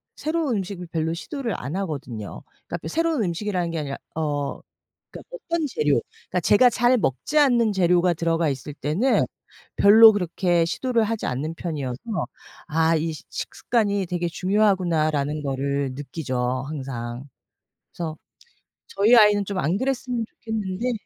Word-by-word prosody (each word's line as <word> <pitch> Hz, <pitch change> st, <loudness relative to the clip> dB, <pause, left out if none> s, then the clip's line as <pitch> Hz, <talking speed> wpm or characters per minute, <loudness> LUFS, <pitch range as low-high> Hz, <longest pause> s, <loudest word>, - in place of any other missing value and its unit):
새로운 310 Hz, -7 st, -1 dB
음식을 185 Hz, -2 st, -5 dB
별로 160 Hz, 0 st, -1 dB
시도를 240 Hz, -, -4 dB
안 140 Hz, +7 st, -5 dB
하거든요. 140 Hz, -, -5 dB, 0.3 s
그러니까 175 Hz, -, -3 dB
바 -, -, -8 dB
새로운 325 Hz, -7 st, 0 dB
음식이라는 180 Hz, -1 st, -2 dB
게 165 Hz, -, -2 dB
아니라 140 Hz, -2 st, -4 dB, 0.2 s
어 145 Hz, -3 st, -2 dB, 0.5 s
그러니까 -, -, -9 dB
어떤 335 Hz, -10 st, -2 dB
재료 150 Hz, -, +1 dB, 0.3 s
그러니까 180 Hz, -, 0 dB
제가 225 Hz, +9 st, +5 dB
잘 245 Hz, +2 st, +3 dB
먹지 210 Hz, -, -1 dB
않는 240 Hz, -6 st, +4 dB
재료가 180 Hz, -1 st, +3 dB
들어가 165 Hz, -1 st, 0 dB
있을 140 Hz, +2 st, -5 dB
때는 160 Hz, -, +1 dB, 0.5 s
별로 220 Hz, +2 st, +9 dB
그렇게 175 Hz, -3 st, +1 dB
시도를 235 Hz, +6 st, 0 dB
하지 220 Hz, 0 st, -2 dB
않는 150 Hz, +6 st, -3 dB
편이어서 145 Hz, -8 st, -4 dB, 0.7 s
'아 160 Hz, +1 st, +2 dB
이 160 Hz, +1 st, -1 dB
시 155 Hz, -, -10 dB
식습관이 205 Hz, -5 st, -1 dB
되게 175 Hz, 0 st, -2 dB
중요하구나.'라는 170 Hz, -6 st, +1 dB
거를 140 Hz, 0 st, -1 dB
느끼죠 130 Hz, -3 st, -3 dB
항상. 130 Hz, -3 st, -6 dB, 0.6 s
그래서 160 Hz, -2 st, -5 dB, 0.7 s
저희 210 Hz, +5 st, +4 dB
아이는 210 Hz, -3 st, +6 dB
좀 200 Hz, 0 st, -4 dB
안 160 Hz, +5 st, +1 dB
그랬으면 250 Hz, -2 st, -2 dB
좋겠는데 220 Hz, 0 st, -3 dB
175 Hz, 340 characters per minute, -24 LUFS, 150-220 Hz, 0.7 s, 별로